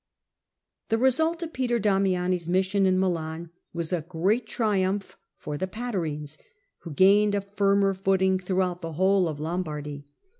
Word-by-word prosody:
The 225 Hz, -, +2 dB
result 320 Hz, +8 st, +2 dB
of 325 Hz, -, -6 dB
Peter 245 Hz, -2 st, 0 dB
Damiani's 185 Hz, -4 st, +1 dB
mission 190 Hz, +2 st, +2 dB
in 185 Hz, 0 st, +3 dB
Milan 165 Hz, -2 st, -2 dB, 0.2 s
was 170 Hz, +1 st, -4 dB
a 175 Hz, -, 0 dB
great 185 Hz, +8 st, 0 dB
triumph 200 Hz, -3 st, -1 dB, 0.2 s
for 145 Hz, -1 st, -6 dB
the 190 Hz, -, -1 dB
Patarines, 165 Hz, -10 st, -4 dB, 0.4 s
who 170 Hz, -, -9 dB
gained 200 Hz, +6 st, +4 dB
a 200 Hz, -, 0 dB
firmer 200 Hz, 0 st, +2 dB
footing 190 Hz, 0 st, +1 dB
throughout 185 Hz, -1 st, -1 dB
the 165 Hz, -1 st, -5 dB
whole 190 Hz, +2 st, +3 dB
of 155 Hz, -2 st, -5 dB
Lombardy. 150 Hz, -3 st, -4 dB
190 Hz, 145 wpm, -26 LUFS, 170-200 Hz, 0.4 s, gained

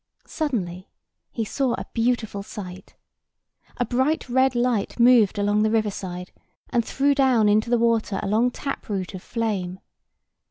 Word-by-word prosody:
Suddenly, 190 Hz, -, -3 dB, 0.4 s
he 225 Hz, -, -2 dB
saw 255 Hz, +3 st, 0 dB
a -, -, -6 dB
beautiful 230 Hz, -3 st, 0 dB
sight. 190 Hz, -2 st, -9 dB, 0.8 s
A 245 Hz, -, 0 dB
bright 260 Hz, +7 st, 0 dB
red 260 Hz, +1 st, +2 dB
light 240 Hz, -3 st, 0 dB
moved 235 Hz, -4 st, +5 dB
along 205 Hz, +1 st, +2 dB
the 215 Hz, -, +3 dB
river 215 Hz, -2 st, +1 dB
side, 180 Hz, -2 st, -7 dB, 0.4 s
and 235 Hz, -, +2 dB
threw 280 Hz, +5 st, +1 dB
down 260 Hz, -6 st, +3 dB
into 215 Hz, +2 st, +3 dB
the 240 Hz, -, +3 dB
water 230 Hz, -4 st, +1 dB
a -, -, -2 dB
long 220 Hz, +5 st, +3 dB
tap 275 Hz, 0 st, -6 dB
root 190 Hz, -3 st, -3 dB
of 185 Hz, -, -7 dB
flame. 195 Hz, -6 st, -3 dB
225 Hz, 155 wpm, -24 LUFS, 200-245 Hz, 0.8 s, moved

